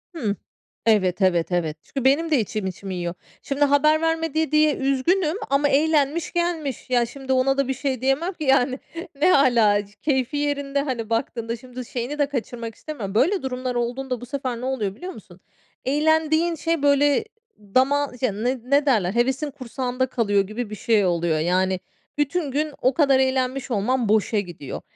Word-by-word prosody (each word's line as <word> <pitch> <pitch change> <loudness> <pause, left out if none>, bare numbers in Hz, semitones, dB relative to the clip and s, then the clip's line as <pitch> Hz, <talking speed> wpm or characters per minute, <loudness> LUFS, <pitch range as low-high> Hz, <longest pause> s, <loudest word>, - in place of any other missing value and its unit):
Hıh. 215 -10 -1 0.5
Evet, 195 -4 +2
evet, 175 -2 +2
evet, 165 -3 -1
çünkü 270 -2 -5
benim 310 +5 +3
de 290 - +4
içim, 215 -2 -2
içimi 190 +1 -6
yiyor. 175 -1 -3 0.3
Şimdi, 280 +1 -1
haber 305 +2 +3
vermedi 325 -1 0
diye 305 -1 +4
üzgünüm 305 +7 +1
ama 280 +1 +2
eğlenmiş 300 +2 +2
gelmiş. 335 -8 -2
Ya, 245 -2 +3
şimdi 265 +2 -4
ona 270 +1 +2
da 275 - +1
bir 265 - 0
şey 265 -2 -3
diyemem 275 +8 0
ki, 315 - -7
yani. 265 -1 +2 0.4
Ne 365 - +6
âlâ, 220 -6 +4
c 205 - -21
keyfi 275 -1 0
yerinde, 285 -1 -1
hani, 245 -6 -3
baktığında 230 0 -2
şimdi, 250 +1 -9
şeyini 250 +6 -4
de 290 - +4
kaçırmak 235 -4 -5
istemiyorum. 220 -11 -6
Böyle 360 - +2
durumlar 255 -1 -3
olduğunda 245 +1 -2
bu - - -7
sefer 255 -2 -4
ne - - -4
oluyor 220 -7 -2
biliyor 365 +8 -7
musun? 180 - -14 0.5
Eğlendiğin 315 +3 +2
şey 330 0 -1
böyle 285 +6 +3 0.3
dama 265 +7 +1
ya, 255 - +2
ne 245 +6 -2
ne 280 +3 +2
derler 205 -9 +2
hevesin 265 +5 0
kursağında 255 -1 -3
kalıyor 205 -5 +1
gibi 220 +1 -5
bir 215 - -6
şey 210 -1 +2
oluyor, 170 -3 +1
yani. 185 +3 +1 0.4
Bütün 295 +1 0
gün 300 +2 -1
o 255 - +3
kadar 275 -2 +4
eğlenmiş 260 0 0
olmam 230 +2 0
boşa 215 0 +2
gidiyor. 175 -8 -7
260 Hz, 175 wpm, -23 LUFS, 225-290 Hz, 0.5 s, Ne